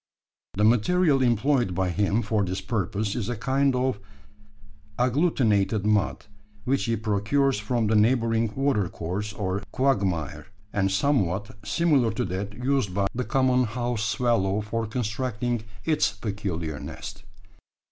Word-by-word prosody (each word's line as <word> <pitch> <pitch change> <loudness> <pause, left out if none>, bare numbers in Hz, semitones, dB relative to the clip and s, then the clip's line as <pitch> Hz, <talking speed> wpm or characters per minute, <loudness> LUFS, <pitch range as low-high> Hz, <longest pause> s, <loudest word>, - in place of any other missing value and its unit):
The 105 - +1
material 135 - +3
employed 120 -3 +2
by 95 0 0
him 100 +5 +1
for 105 0 +1
this 95 0 -2
purpose 105 -1 -2
is 120 -4 -2
a 120 - -1
kind 135 +4 +1
of 125 -3 0 1.0
agglutinated 120 - +2
mud, 105 -2 +1 0.4
which 135 +4 0
he 115 -1 +1
procures 110 +5 +1
from 115 +2 0
the 110 +1 +2
neighbouring 115 0 +2
watercourse 105 -6 -1
or 100 -2 -2
quagmire, 100 - 0 0.3
and 95 -1 +1
somewhat 100 - 0
similar 130 +2 +2
to 125 - -1
that 100 +3 -4
used 125 -5 -1
by 100 -1 +1
the 125 - -2
common 130 -1 +2
house 120 0 -2
swallow 105 -2 +1
for 110 +1 -3
constructing 120 0 -2 0.2
its 155 -10 +2
peculiar 95 - -4
nest. 100 0 -8
110 Hz, 130 wpm, -26 LUFS, 100-125 Hz, 1.0 s, material